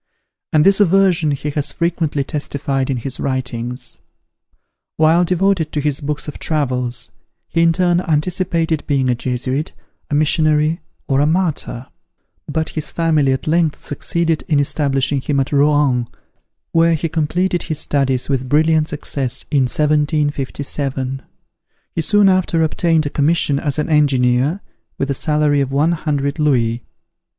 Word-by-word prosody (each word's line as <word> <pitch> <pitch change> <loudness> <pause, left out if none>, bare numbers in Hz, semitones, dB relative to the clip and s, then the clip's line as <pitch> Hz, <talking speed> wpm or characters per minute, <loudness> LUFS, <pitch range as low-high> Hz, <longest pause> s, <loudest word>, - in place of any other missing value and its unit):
And 155 -1 +3
this 195 +1 +5
aversion 185 -4 +3
he 145 +1 -2
has 145 -1 0
frequently 165 -4 -1
testified 140 -2 -2
in 135 - 0
his 125 +2 -5
writings. 125 -2 -4 1.0
While 160 +3 +4
devoted 180 -2 +1
to 150 - -1
his 145 0 -1
books 150 +1 -3
of 150 - -7
travels, 125 -6 -1 0.4
he 165 - +1
in 165 0 +5
turn 175 0 +2
anticipated 165 -1 -1
being 135 -3 +1
a - - +3
Jesuit, 130 +4 -3 0.4
a 145 - 0
missionary 155 +1 +2 0.3
or 135 -2 +1
a 145 - +3
martyr; 160 -7 -1 0.6
but 160 +1 -2
his 155 -2 -3
family 155 -5 +2
at 130 - -2
length 160 -1 +1
succeeded 165 +2 -1
in 150 -3 +2
establishing 140 -1 +1
him 140 +1 -1
at 135 - -1
Rouen, 145 -4 +2 0.6
where 165 0 +3
he 165 +2 -2
completed 170 +3 0
his 155 -3 -3
studies 135 -4 0
with 130 -2 -2
brilliant 155 +1 +3
success, 135 -3 -3
in 140 -4 +3
1757. 145 -2 -1 0.7
He 165 - -1
soon 205 +4 +4
after 185 -3 +2
obtained 160 0 +1
a 145 - -3
commission 145 -1 +1
as 145 -1 -2
an 150 - -1
engineer, 140 +2 +2 0.4
with 135 0 -1
a - - +1
salary 150 0 +1
of 135 -1 -2
one 145 +5 +2
hundred 145 -2 -2
louis. 120 -6 +1
150 Hz, 145 wpm, -18 LUFS, 135-165 Hz, 1.0 s, this